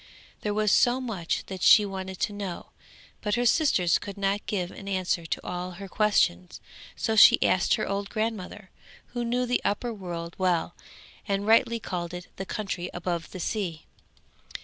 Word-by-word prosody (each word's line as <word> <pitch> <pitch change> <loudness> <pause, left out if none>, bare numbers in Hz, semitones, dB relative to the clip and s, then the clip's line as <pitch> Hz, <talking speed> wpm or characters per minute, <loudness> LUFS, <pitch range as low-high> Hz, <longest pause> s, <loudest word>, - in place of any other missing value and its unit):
There 210 -1 -2
was 215 -1 +2
so 245 +4 +4
much 215 -10 -3
that 190 -2 -7
she 210 - +7
wanted 190 -1 -5
to 210 - 0
know, 200 -4 -6 0.5
but 210 -1 0
her 245 0 0
sisters 220 - +3
could 200 +1 -8
not 200 +1 0
give 185 -4 -2
an 195 - -10
answer 185 -3 -1
to - - -3
all 180 0 -4
her 195 +2 -8
questions, 185 - +1 0.4
so 220 - -1
she 215 - +8
asked 180 - +3
her - - -2
old 200 0 -2
grandmother, 215 -3 -4 0.4
who 240 -1 -2
knew 245 +2 0
the 245 0 0
upper 230 +4 -1
world 170 -4 -6
well, 175 -2 +1 0.5
and 200 0 -1
rightly 230 +1 +4
called 175 -4 -4
it 180 0 -9
the 190 - -5
country 190 -4 -4
above 175 -1 -3
the 185 - -8
sea. 175 -5 -3
195 Hz, 170 wpm, -27 LUFS, 180-215 Hz, 0.5 s, she